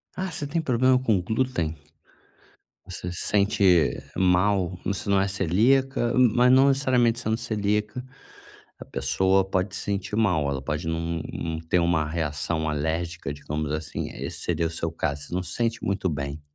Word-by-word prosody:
Ah, 190 +1 -3
você 150 - -4
tem 160 +4 -1
problema 130 -2 +3
com 115 -6 +2
glúten? 110 -5 -1 1.1
Você 90 - -5
se 90 - -3
sente 100 -5 +3
mal, 95 0 +2
você 100 0 -2
não 100 -1 +4
é 95 - +1
celíaca, 120 +7 +2
m 125 -3 +5
mas 125 +1 +5
não 135 +1 +6
necessariamente 125 -4 +2
sendo 110 -2 -1
celíaca, 105 +1 -1 0.7
a - - -9
pessoa 95 0 +1
pode 95 0 -1
sentir 100 0 -3
mal, 90 -10 +2
ela 70 -1 -2
pode 75 +4 -3
não 85 0 -2
não 80 -1 -3
ter 80 +2 +1
uma 85 -3 +1
reação 80 0 -2
alérgica, 80 0 -2
digamos 75 +1 -4
assim, 75 -1 -4
esse - - -6
seria 85 - 0
o - - -7
seu 85 0 -3
caso, 70 -3 -2
você 70 - -7
não 90 - 0
se 90 0 -7
sente 115 -1 -1
muito 95 -1 0
bem. 70 -1 -4
95 Hz, 165 wpm, -25 LUFS, 80-115 Hz, 1.1 s, não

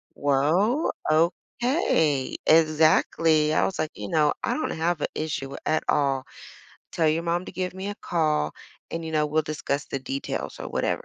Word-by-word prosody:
well, 165 - +2 0.2
okay." 165 - +1
Exactly, 155 0 +4
I - - +3
was 190 - -3
like, 155 -1 -1
you 105 - -6
know, 150 -2 +3
"I - - 0
don't 310 - -2
have 165 -1 -1
a - - +1
issue 145 -3 -3
at 155 - +1
all. 135 -3 +2 0.7
Tell 160 -2 +2
your 160 +2 +1
mom 170 +1 -1
to - - -8
give 185 0 -3
me 190 +1 -5
a 205 - -4
call, 155 -3 0 0.4
and, 165 0 -4
you 160 - -5
know, 150 -1 +2
we'll 155 +1 +1
discuss 150 -1 -3
the 140 - -3
details 135 +1 -4
or - - -5
whatever." - - -1
155 Hz, 175 wpm, -25 LUFS, 150-170 Hz, 0.7 s, Exactly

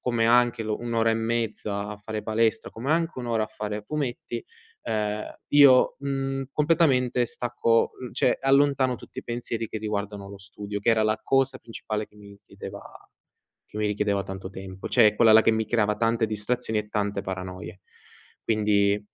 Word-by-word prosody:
come 120 -2 0
anche 120 0 +3
l 110 - -6
un'ora 115 +1 0
e - - +2
mezza 110 -3 -2
a 105 - -6
fare 105 0 -5
palestra, 110 0 0
come 120 +6 -4
anche 165 -3 0
un'ora 120 -3 -1
a - - -1
fare 105 0 -5
fumetti, 120 -2 -4 0.4
ehm, 105 -1 -1 0.2
io, 140 -3 +6
mhmm, 135 -1 -2
completamente 135 -6 +2
stacco, 115 -1 +1
uhm, 125 -2 -6
cioè, 125 - +1
allontano 135 -1 +3
tutti - - -12
i - - -4
pensieri 120 -1 -4
che - - -5
riguardano 105 -2 -4
lo 100 - -10
studio, 100 +1 -7
che 100 - -2
era 110 -1 +4
la 110 0 +1
cosa 135 -1 +1
principale 110 -2 -5
che 105 - -25
mi 100 -1 -14
chiedeva - - -9 0.9
che - - -7
mi 105 - 0
richiedeva 105 -1 0
tanto 95 0 -7
tempo, 95 0 -8
cioè, 110 -4 +5
quella 115 0 +5
là 110 0 +7
che - - +4
mi 110 -1 -1
creava 105 -2 +1
tante 115 +1 +1
distrazioni 110 +1 -2
e 105 0 -7
tante 100 -2 -1
paranoie. 95 -1 -7 0.6
Quindi, 105 -2 +2
110 Hz, 175 wpm, -26 LUFS, 105-120 Hz, 0.9 s, là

